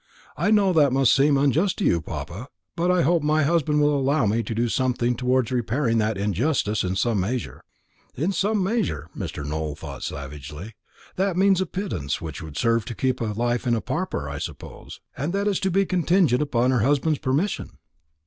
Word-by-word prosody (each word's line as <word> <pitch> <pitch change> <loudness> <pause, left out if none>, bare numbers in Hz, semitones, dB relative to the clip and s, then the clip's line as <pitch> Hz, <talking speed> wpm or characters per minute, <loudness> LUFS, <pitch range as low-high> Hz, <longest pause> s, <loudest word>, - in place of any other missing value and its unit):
I - - 0
know 205 -3 +4
that 145 -5 +4
must 135 -1 +4
seem 140 +1 +4
unjust 145 +7 +2
to - - -1
you, 85 - +2
papa; 95 - -7 0.3
but 175 +1 0
I 180 -2 +3
hope 170 +2 +3
my 155 +1 +2
husband 150 -1 +2
will 145 0 +3
allow 140 -1 +1
me 110 +3 +1
to 115 - -5
do 120 +2 +1
something 125 0 0
towards 125 0 +1
repairing 120 0 0
that 110 -1 0
injustice 105 - 0
in 90 0 -2
some 110 +2 +1
measure." 100 - -3 0.5
"In 165 +9 0
some 205 +1 +1
measure!" 190 - -2
Mr. 70 - -5
Nowell 75 0 -3
thought 75 -3 -8
savagely. 75 +7 -7 0.4
"That 190 -1 0
means 190 -1 +4
a 190 - -1
pittance 160 - -3
that 80 -4 -7
would 80 -2 -8
serve 115 -1 +2
to 120 -3 -6
keep 130 +1 -1
life 120 +3 -1
in 120 - +3
a - - 0
pauper, - - -3
I - - -5
suppose; - - -8 0.2
and 150 +6 -3
that 200 +1 0
is 200 -3 +1
to 190 - 0
be 195 +2 +2
contingent 175 -7 +2
upon 125 -3 +1
her 125 - +2
husband's 145 +5 +1
permission." 150 +10 -2
130 Hz, 195 wpm, -24 LUFS, 110-165 Hz, 0.5 s, know